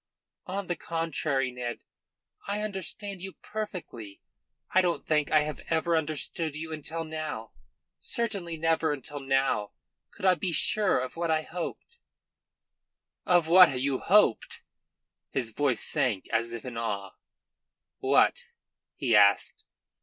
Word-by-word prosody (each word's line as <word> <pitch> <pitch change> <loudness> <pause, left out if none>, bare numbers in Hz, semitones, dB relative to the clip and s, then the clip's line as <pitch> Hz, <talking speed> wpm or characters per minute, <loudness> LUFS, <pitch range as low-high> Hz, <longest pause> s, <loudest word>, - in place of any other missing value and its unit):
"On 195 +2 -3
the 175 - -2
contrary, 155 -6 -1
Ned, 125 -1 -5 0.6
I 205 +1 -1
understand 200 -1 -4
you 190 0 -7
perfectly. 175 - -7 0.5
I 185 - +5
don't 175 -2 -1
think 150 -2 +1
I 155 - +5
have 150 -1 -4
ever 165 +1 +2
understood 155 0 -1
you 160 +1 -5
until 160 +2 -5
now. 155 -8 -5 0.5
Certainly 200 -8 -2
never 160 -1 +1
until 145 +1 -7
now 135 -6 0 0.4
could - - -8
I 185 - +7
be 180 -1 -2
sure 205 +6 +3
of 130 0 -3
what 170 0 -1
I 155 0 +2
hoped." 180 - -7 1.3
"Of 175 -3 +4
what 170 -6 +7
you 135 0 0
hoped?" 200 - +3 0.7
His 120 -4 -2
voice 135 -1 0
sank 110 -7 0
as 115 +1 0
if 115 0 -6
in 125 -2 -6
awe. 100 -4 -3 0.9
"What?" - - +3 0.5
he 115 - +1
asked. 100 -1 +4
155 Hz, 130 wpm, -28 LUFS, 130-180 Hz, 1.3 s, I